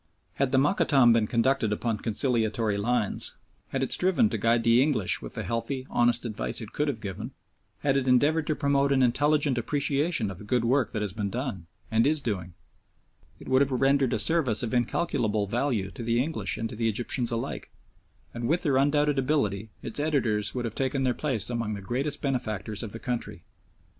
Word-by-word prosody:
Had 135 -2 +1
the 135 - +3
Mokattam 135 - +4
been 115 -2 +2
conducted 115 -1 +1
upon 110 0 -1
conciliatory 110 -2 0
lines, 110 +1 -1 0.3
had 135 0 -2
it 130 - -2
striven 190 +5 +3
to - - -1
guide 115 0 +2
the 115 +2 +5
English 130 -10 +1
with - - -9
the - - -3
healthy, 120 +3 -3
honest 120 0 +2
advice 110 -1 -2
it 110 -3 -8
could 150 - 0
have 135 -6 -2
given, 100 -5 -6 0.5
had 135 -2 +1
it 135 -1 0
endeavoured 150 +5 +3
to 155 - +1
promote 140 -1 +1
an 135 -1 +3
intelligent 145 +1 +2
appreciation 140 - 0
of 95 - -8
the - - -9
good 120 +3 0
work 125 -2 +2
that 105 -3 -2
has 100 -3 -3
been 105 -2 -3
done 115 -8 -4 0.2
and 115 +3 +3
is 155 +1 +2
doing, 90 -9 -4 0.8
it - - -12
would 130 +1 +3
have 140 -1 +2
rendered 135 0 +2
a - - +1
service 130 -3 +3
of 120 - -3
incalculable 120 -4 0
value 110 -3 -1
to - - -9
the 115 0 0
English 155 +5 -1
and 115 - -2
to - - -8
the 115 +1 0
Egyptians 120 +2 0
alike, 115 -1 -4 0.6
and 120 0 -3
with 165 +6 +1
their 140 -4 +2
undoubted 145 +1 +2
ability 110 -7 0
its - - -3
editors 120 -9 0
would 125 -1 -2
have 115 - -4
taken 135 +1 -1
their 130 -1 +2
place 125 -7 -2
among 115 -3 -2
the - - -6
greatest 130 +9 -3
benefactors 110 -6 -2
of 115 -4 -5
the 115 - -6
country. 120 -1 -4
120 Hz, 200 wpm, -27 LUFS, 110-140 Hz, 0.8 s, the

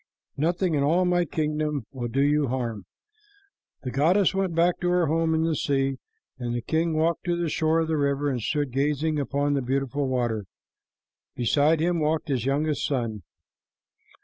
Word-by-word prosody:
Nothing 170 +4 0
in 145 - +1
all 165 +6 +3
my 175 -1 +2
kingdom 150 -4 -2
will 125 -3 -4
do 135 +4 +1
you 145 0 +2
harm." 115 -6 -3 1.0
The 125 - -4
goddess 175 +9 +3
went 190 -3 -1
back 170 +1 +2
to 175 - 0
her 180 -1 +3
home 160 +1 +1
in 160 - +1
the 165 -1 +1
sea, 135 -1 0 0.4
and 120 -1 -3
the 120 - -3
king 160 +3 0
walked 165 +2 +1
to 175 -1 +1
the 170 -1 -1
shore 160 +1 +1
of 160 - -1
the 160 -1 0
river 140 0 0
and 130 -4 -1
stood 145 +3 -1
gazing 150 +3 0
upon 145 +1 0
the 140 - +1
beautiful 135 +2 -1
water. 120 -5 -1 0.9
Beside 145 +6 +2
him 170 0 +1
walked 155 +1 0
his 130 -4 -1
youngest 150 +2 0
son. 115 -6 -2
150 Hz, 175 wpm, -25 LUFS, 135-165 Hz, 1.0 s, all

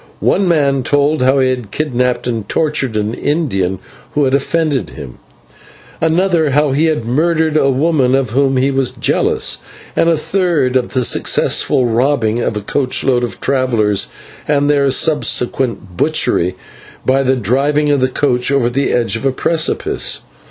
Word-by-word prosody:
One 195 - +1
man 140 -5 +2
told 145 +3 +1
how 130 +2 +3
he 130 -1 +2
had 125 -5 -5
kidnapped 125 -2 -1
and 115 -4 -3
tortured 150 -7 0
an 105 +1 -2
Indian 110 - -1 0.4
who 145 - +2
had 130 -1 +1
offended 145 0 0
him; 70 -5 -10 0.8
another, 165 -1 +2
how 145 +1 +2
he 145 +4 +1
had 155 -8 -1
murdered 160 +5 0
a 140 -3 +3
woman 135 -2 +1
of 135 -4 -1
who 135 +1 +1
he 130 +2 +1
was 135 -2 -1
jealous; - - 0 0.4
and 165 - +2
the 165 - +2
third, 155 -7 0
of 125 -2 0
the 130 -2 +1
successful 125 +2 +2
robbing 120 -1 +1
of 115 -2 -2
a - - -3
coach 130 +5 0
load 125 -2 +1
of 120 - -5
travellers, 115 -7 +1 0.4
and 145 -1 +1
their 140 -1 +2
subsequent 125 - -1
butchery 90 +2 +1 0.5
by 135 +1 +2
the 130 0 +1
driving 140 +6 +1
of 145 -1 +2
the 130 0 +1
coach 125 -1 0
over 130 -4 +1
the 135 +3 0
edge 120 -2 +1
of 115 - -5
a 135 - +2
precipice. 160 +4 -1
135 Hz, 165 wpm, -15 LUFS, 125-150 Hz, 0.8 s, how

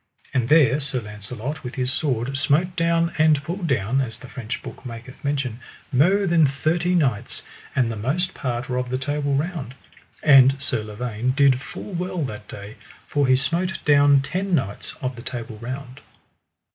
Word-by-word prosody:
And 125 -3 +1
there 145 -3 +5
Sir 135 -3 -1
Launcelot 110 +6 -6
with 125 - -6
his 130 0 0
sword 135 -3 -1
smote 155 +6 +2
down 170 0 +2
and 155 -2 +4
pulled 175 +3 -3
down, 130 0 +1
as 115 -4 -4
the 125 - -12
French 120 -2 -6
book - - -9
maketh 120 0 -9
mention, 135 -5 -1 0.3
mo 185 +10 +4
than 170 -4 +4
thirty 165 +6 0
knights, 130 - 0 0.3
and 125 -4 +2
the - - -4
most 140 - -1
part 125 -2 -3
were 125 - -2
of 125 0 -2
the 130 - -1
Table 145 +1 -1
Round; 145 -4 -3 0.5
and 135 -2 +7
Sir 130 -4 +1
Lavaine 110 +3 -2
did 140 -3 +4
full 190 +9 -8
well 180 -1 -2
that 105 -5 -6
day, 100 +1 -9 0.3
for 145 -2 +1
he 130 - +5
smote 170 +8 0
down 145 -1 +5
ten 185 +5 -1
knights 110 -9 -3
of 130 0 -2
the 120 - -9
Table 115 -3 -6
Round. 130 +3 -7
135 Hz, 175 wpm, -23 LUFS, 125-155 Hz, 0.5 s, and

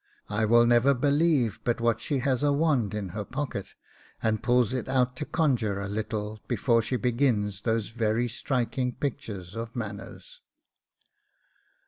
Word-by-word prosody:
'I 105 +2 +1
will 120 +2 +5
never 120 +4 +4
believe 140 - +2
but 120 -1 0
what 115 -1 +1
she 145 - -1
has 130 -1 +1
a 145 0 +3
wand 140 -9 +1
in 100 -3 -3
her 105 +4 -4
pocket, 130 -4 -5 0.5
and 110 -1 +1
pulls 125 -1 +2
it 130 0 -3
out 125 -1 +2
to 150 - -3
conjure 120 - +1
a 100 - -3
little 105 +1 -3
before 120 0 +2
she 120 +4 -2
begins 115 -5 +1
those 110 -2 0
very 115 +1 0
striking 125 +1 -1
pictures 105 -10 -5
of 115 +1 -6
manners. 105 -4 -7
120 Hz, 150 wpm, -27 LUFS, 105-130 Hz, 0.5 s, will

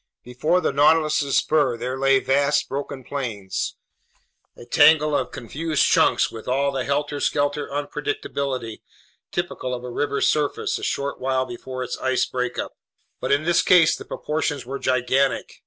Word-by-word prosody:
Before 150 +9 0
the - - 0
Nautilus's 150 -1 +3
spur 145 -6 +2
there 125 +2 -3
lay 135 0 +3
vast 140 +2 +1
broken 140 -1 -5
plains, 115 -9 -4 0.8
a - - -11
tangle 150 +3 +5
of - - -1
confused 155 +6 -1
chunks - - +3
with 110 -1 -9
all 140 +2 +1
the 135 -2 -3
helter 145 +1 -1
skelter 145 0 0
unpredictability 140 - -3 0.5
typical 130 -8 -3
of 120 - -8
a 125 - -6
river's 140 +2 0
surface 150 -2 0
a - - -10
short 140 0 -2
while 130 0 0
before 130 +1 -6
its 125 - -5
ice 130 -1 +1
breakup; 125 -1 -4 0.4
but - - -2
in 145 +2 +3
this 170 +1 +3
case 175 -3 +5
the - - -9
proportions 150 -3 -3
were 135 +2 -5
gigantic. 130 +2 0
140 Hz, 155 wpm, -23 LUFS, 130-150 Hz, 0.8 s, tangle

